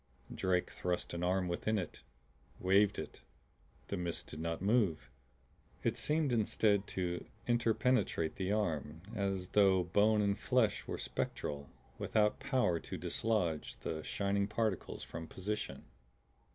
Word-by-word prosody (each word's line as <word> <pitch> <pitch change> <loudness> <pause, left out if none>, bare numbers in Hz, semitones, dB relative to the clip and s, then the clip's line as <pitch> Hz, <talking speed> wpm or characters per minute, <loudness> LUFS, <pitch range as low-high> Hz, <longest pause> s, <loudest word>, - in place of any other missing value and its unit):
Drake 90 -1 +1
thrust 90 -1 -2
an 85 - -3
arm 90 +1 +2
within 105 +5 0
it, 90 -4 -4 0.6
waved 100 +2 +4
it; - - -6 0.7
the 100 - -1
mist 85 -2 -3
did 75 - -9
not 85 0 -2
move. 95 - +2 0.7
It - - +1
seemed 150 -2 +1
instead 105 -2 +2
to 90 -1 -1 0.2
interpenetrate 120 -7 +2
the 95 0 -1
arm 80 -6 -1
as 95 -3 -1
though 95 -3 +5
bone 105 +5 +3
and 100 0 +1
flesh 125 -5 +2
were - - -3
spectral, 70 -1 -3 0.3
without 105 -1 +2
power 125 - +2
to - - -6
dislodge 95 -9 -1
the 80 - -3
shining 100 +4 0
particles 105 -3 -1
from 80 0 -7
position. 105 +5 -4
100 Hz, 130 wpm, -35 LUFS, 85-105 Hz, 0.7 s, though